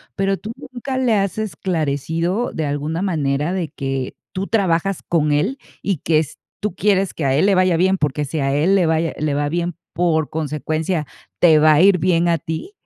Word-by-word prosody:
¿Pero 195 0 0
tú 215 +4 -7
nunca 260 +1 -6
le 250 -4 +2
has 195 -2 0
esclarecido, 170 - -1
de 160 - -2
alguna 145 +4 -2
manera, 150 -4 0
de 180 -5 -2
que 135 -3 -4 0.2
tú 190 +1 -3
trabajas 195 -3 +1
con 155 -3 +1
él 195 - 0 0.2
y 195 -3 -1
que 155 +2 +2
s 155 -3 -4 0.3
tú 210 -4 -2
quieres 195 0 +1
que 155 - -3
a 135 -1 +2
él 150 - +3
le 200 - +4
vaya 185 -1 +3
bien? 190 +2 +3
Porque 150 -2 -1
si 155 +3 -3
a 135 -1 0
él 160 +7 +3
le 185 -3 +3
vaya 160 0 +1
le 150 -1 -1
va 145 0 0
bien, 170 +1 -2 0.2
por 160 -3 +1
consecuencia, 155 +2 -2 0.3
te 160 -3 +6
va 155 0 +6
a 150 - +4
ir 195 0 +6
bien 175 0 +2
a 170 - +3
ti. 160 - -5
165 Hz, 205 wpm, -20 LUFS, 150-190 Hz, 0.3 s, te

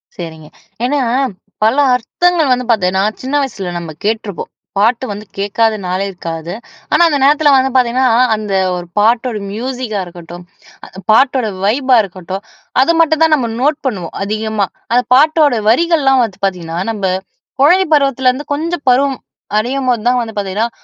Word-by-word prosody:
சரிங்க. 160 -3 -8 0.4
ஏன்னா, 285 +1 0 0.6
பல 225 +3 +3 0.2
அர்த்தங்கள் 320 +4 +1
வந்து 250 0 -2
பார்த்தீங்னா, 190 -2 +1 0.2
சின்ன 265 +3 -3
வயசுல, 195 -9 -4
நம்ப 165 -2 -7
கேட்ருப்போம். 215 -3 -3 0.3
பாட்டு 230 +5 +2
வந்து 205 +1 -7
கேட்காத 215 +3 +1
நாளே 185 +2 -1
இருக்காது. 170 -2 -6 0.4
ஆனா 345 - +5
அந்த 290 - +1
நேரத்தில 295 +1 +4
வந்து 265 0 +3
பார்த்தீங்கன்னா, 255 +1 +3 0.3
அந்த 210 -2 -4 0.2
ஒரு 175 -1 -6
பாட்டோட 230 +1 +2
மியூசிக்கா 240 -2 -4
இருக்கட்டும், 175 0 -11 0.7
பாட்டோட 255 0 +3 0.2
வைப்பா 255 +4 +2
இருக்கட்டும், 190 +1 -7 0.4
அது 335 +5 +3
மட்டும் 320 -1 +3
தான் 320 -1 +4
நம்ப 245 -5 -1
நோட் 295 +2 +1
பண்ணுவோம், 180 -9 -4
அதிகமா. 215 -1 -1 0.3
அந்த 250 - +3
பாட்டோட 300 -2 +4
வரிகள்ல்லாம் 275 -2 +3
வந்து 195 -4 -5
பார்த்தீங்கன்னா, 170 -3 -3
நம்ப 200 -3 -3 0.6
கொழந்தை 360 +6 +5
பருவத்திலருந்து, 265 -3 +2
வந்து - - -11
கொஞ்சம் 330 -1 -4
பருவம் 270 0 +1 0.4
அடையும்போது 250 -1 -1
தான் 250 0 +2
வந்து, 225 -2 -6
பார்த்தீங்கன்னா, 205 +4 -1
235 Hz, 145 wpm, -15 LUFS, 195-270 Hz, 0.7 s, ஆனா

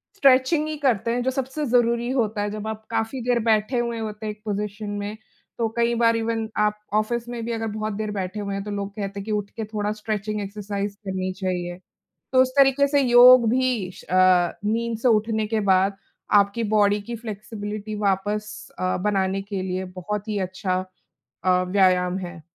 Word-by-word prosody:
Stretching 275 0 +4
ही 310 - -3
करते 235 -5 +1
हैं 245 +1 0
जो 260 - +1
सबसे 270 +3 -3
ज़रूरी 240 0 +2
होता 220 -5 0
है, 205 - -1
जब 215 0 -5
आप 220 0 -5
काफ़ी 225 +3 -2
देर 245 0 +1
बैठे 220 +2 +2
हुए 235 -1 -2
होते 215 0 -5
हैं 210 - -2
एक 210 - -23
पोज़िशन 210 0 -3
में। 205 +2 -5 0.4
तो 230 -1 +1
कई 235 0 +2
बार 230 -1 +3
इवेन 225 -1 -1
आप 210 0 +1
ऑफ़िस 230 +3 0
में 235 -1 -5
भी 235 - -3
अगर 225 -1 -2
बहुत 215 0 -3
देर 215 0 -3
बैठे 195 +1 -4
हुए 200 -1 -3
हैं 195 - -3
तो 210 - -6
लोग 200 0 -3
कहते 200 -1 -4
हैं - - -5
कि 220 - -4
उठ 205 -1 -1
के 220 - -2
थोड़ा 210 -1 -2
स्ट्रेचिंग 215 -1 -3
एक्सरसाइज़ 200 0 -4
करनी 185 -1 -2
चाहिए। 180 -2 -3 0.6
तो 260 0 +6
उस 255 - 0
तरीके 275 +1 +5
से 285 0 +3
योग 245 -1 +8
भी 250 -7 0
श - - -13
अ, 185 -1 +4
नींद 230 +1 -1
से 250 - +2
उठने 220 -1 +2
के 220 0 0
बाद 195 0 +3 0.4
आपकी 200 +4 -1
बॉडी 205 0 +3
की 235 +2 -6
फ्लेक्सिबिलिटी 215 -1 -6
वापस 205 +2 0 0.3
अ, 185 0 0
बनाने 195 -1 +1
के 195 -2 -4
लिए 185 0 -3
बहुत 210 +3 -4
ही 210 -1 -1
अच्छा 185 0 -1 0.6
अ, 180 0 +3
व्यायाम 185 -1 +3
है। 175 -2 -10
215 Hz, 195 wpm, -24 LUFS, 200-235 Hz, 0.6 s, योग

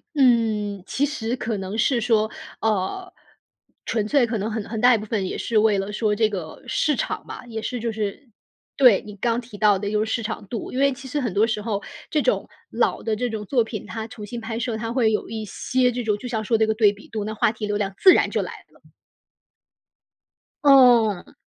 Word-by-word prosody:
嗯， 220 -7 +2
其 285 - +1
实 245 -5 -3
可 225 -4 -3
能 195 +2 -5
是 235 +2 +2
说， 220 -2 +2 0.3
呃， 220 - -1 0.7
纯 215 -2 -1
粹 270 +1 +3
可 230 -1 -2
能 210 +3 -2
很 215 -2 -4
很 220 0 -4
大 245 0 +6
一 - - +1
部 215 - -6
分 205 -3 -1
也 - - -4
是 230 - -1
为 210 -1 +4
了 195 +1 -3
说 210 0 0
这 220 0 +2
个 180 -6 -7
市 300 - +1
场 - - -3
嘛， - - -8
也 225 -2 -5
是 250 +1 -3
就 230 0 -2
是 215 +5 -4 0.5
对， 250 -8 +6
你 210 - -9
刚 235 +2 0
提 230 -3 -12
到 205 -1 +4
的 200 +1 -3
就 215 0 +1
是 220 - -4
市 230 - -1
场 210 -2 -5
度。 225 +1 -5
因 255 - -3
为 280 0 +4
其 265 0 -8
实 290 +3 -2
很 240 -7 -2
多 210 +3 +4
时 220 -2 -2
候 205 -2 -2 0.3
这 305 - +1
种 - - 0 0.2
老 - - 0
的 220 -1 0
这 245 +3 -2
种 220 -2 -5
作 245 +1 +2
品， 220 -2 -6
它 220 -1 -6
重 215 -2 -9
新 235 +3 -6
拍 225 0 -4
摄 235 -1 -2
它 225 +1 -4
会 235 -3 +2
有 210 - -2
一 220 -1 -4
些 250 +5 0
这 245 0 -3
种 210 -2 0
就 250 - -7
像 220 -3 -2
说 225 +1 +1
这 220 - +3
个 220 - +1
对 215 -2 +4
比 205 - -15
度， 215 -2 -3
那 215 - -4
话 215 - +2
题 215 -1 -5
流 205 - 0
量 195 -2 -2
自 375 - +8
然 - - +2
就 - - 0
来 - - -5 0.2
了。 - - -24 1.8
哦。 245 -8 +5
220 Hz, 250 characters per minute, -23 LUFS, 210-245 Hz, 1.8 s, 自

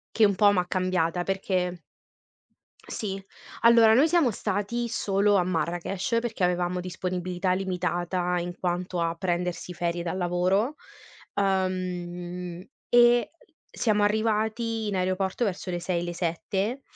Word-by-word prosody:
Che 220 - +6
un 200 - +1
po' 205 +2 +5
m'ha 180 -2 +1
cambiata 180 -2 0
perché 185 -2 -1 1.1
sì, 195 -2 -4 0.4
allora 230 -1 +7
noi 280 +6 +5
siamo 330 -7 +3
stati 210 +4 -2
solo 205 -2 +2
a 180 - +3
Marrakech 175 +5 -1
perché 230 -4 -3
avevamo 180 0 +1
disponibilità 180 0 -2
limitata, 180 -1 -1
in 175 0 -4
quanto 180 0 -2
a 165 0 0
prendersi 180 0 -2
ferie 175 0 -2
dal 170 +1 -3
lavoro, 185 +8 +1 0.6
uhm, 180 -2 -2 0.2
e 240 0 +5 0.4
siamo 210 -3 +2
arrivati 220 +1 0
in 200 - -1
aeroporto 185 +4 0
verso 190 -2 -3
le 175 - -2
6, 175 -1 -1
le 175 0 -4
7, 195 +8 -2
185 Hz, 125 wpm, -26 LUFS, 180-210 Hz, 1.1 s, allora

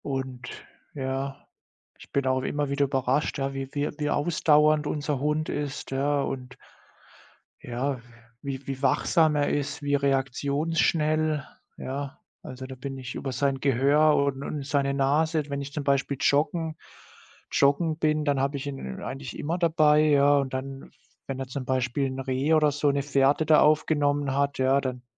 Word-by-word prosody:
Und 130 -3 -4 0.5
ja, 135 0 -4 0.5
ich - - -15
bin 140 -1 0
auch 130 0 +1
immer 145 +2 -2
wieder 140 0 +1
überrascht, 135 +2 0
ja, 135 0 -2
wie 135 -1 -5
wie 145 0 -1
wie 150 -1 -1
ausdauernd 150 -1 +3
unser 150 -2 -2
Hund 150 +2 -1
ist, 145 -2 -4
ja, 140 +2 +1
und 125 -2 -5 1.1
ja, 125 +1 -3 0.4
wie 135 -1 -5
wie 135 -1 -4
wachsam 155 +3 +3
er 145 -1 +1
ist, 145 +2 -2
wie 145 0 +1
reaktionsschnell. 150 +3 +1 0.3
Ja, 140 +1 -5 0.2
also, 130 0 -8
da 130 0 -8
bin 135 +1 -6
ich 125 -2 -7
über 135 - -4
sein 135 +2 0
Gehör 140 +4 +3
und 140 -1 0
und 145 -2 -4
seine 140 -1 0
Nase 150 +3 +2
wenn 140 0 -3
ich 140 0 -7
zum 150 - -3
Beispiel 140 0 0
joggen 155 +2 +1 0.8
joggen 155 +3 +2
bin, 155 -1 +1
dann 140 -2 +1
habe 140 +1 0
ich 135 - -6
ihn 135 - -6
eigentlich 135 -1 -6
immer 165 +4 -2
dabei, 155 -3 +4
ja, 145 -1 +5
und 135 -2 -1
dann, 135 +1 -6 0.4
wenn 135 -1 -4
er 135 - -4
zum 130 0 -5
Beispiel 130 +1 0
'n 130 0 -5
Reh 135 +4 +1
oder 155 -1 +4
so 145 0 +1
'ne 140 0 -1
Fährte 140 +2 +2
da 155 0 +6
aufgenommen 145 -2 +2
hat, 140 0 0
ja, 130 +1 +3
dann 125 -2 -4
140 Hz, 165 wpm, -26 LUFS, 135-150 Hz, 1.1 s, da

